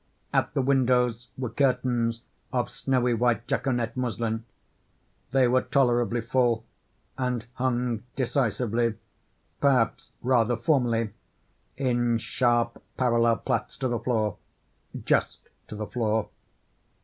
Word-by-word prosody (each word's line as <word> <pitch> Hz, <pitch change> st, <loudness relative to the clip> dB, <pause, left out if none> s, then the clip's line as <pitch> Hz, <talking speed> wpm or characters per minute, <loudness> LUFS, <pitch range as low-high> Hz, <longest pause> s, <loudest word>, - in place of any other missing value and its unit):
At -, -, +1 dB
the 135 Hz, -, +2 dB
windows 125 Hz, -3 st, +2 dB
were 125 Hz, -3 st, -3 dB
curtains 120 Hz, -3 st, +1 dB, 0.3 s
of 120 Hz, -2 st, -1 dB
snowy 125 Hz, -2 st, +1 dB
white 115 Hz, -1 st, +1 dB
jaconet 120 Hz, -4 st, -1 dB
muslin: 115 Hz, -3 st, -2 dB, 0.8 s
they 130 Hz, 0 st, +4 dB
were 130 Hz, +1 st, +3 dB
tolerably 120 Hz, -4 st, +2 dB
full, 115 Hz, -1 st, +1 dB, 0.5 s
and 125 Hz, -3 st, -1 dB
hung 125 Hz, -3 st, -1 dB
decisively, 120 Hz, -3 st, 0 dB, 0.6 s
perhaps 135 Hz, -5 st, +2 dB
rather 120 Hz, -2 st, +3 dB
formally 115 Hz, -4 st, +1 dB, 0.7 s
in 120 Hz, -3 st, +1 dB
sharp, 120 Hz, 0 st, 0 dB, 0.2 s
parallel 115 Hz, -2 st, +3 dB
plaits 125 Hz, -4 st, -2 dB
to 130 Hz, -, -1 dB
the 120 Hz, -2 st, -1 dB
floor—just 110 Hz, -4 st, -2 dB, 0.3 s
to -, -, -7 dB
the 105 Hz, 0 st, -4 dB
floor. 110 Hz, -2 st, -1 dB
120 Hz, 105 wpm, -27 LUFS, 115-125 Hz, 0.8 s, they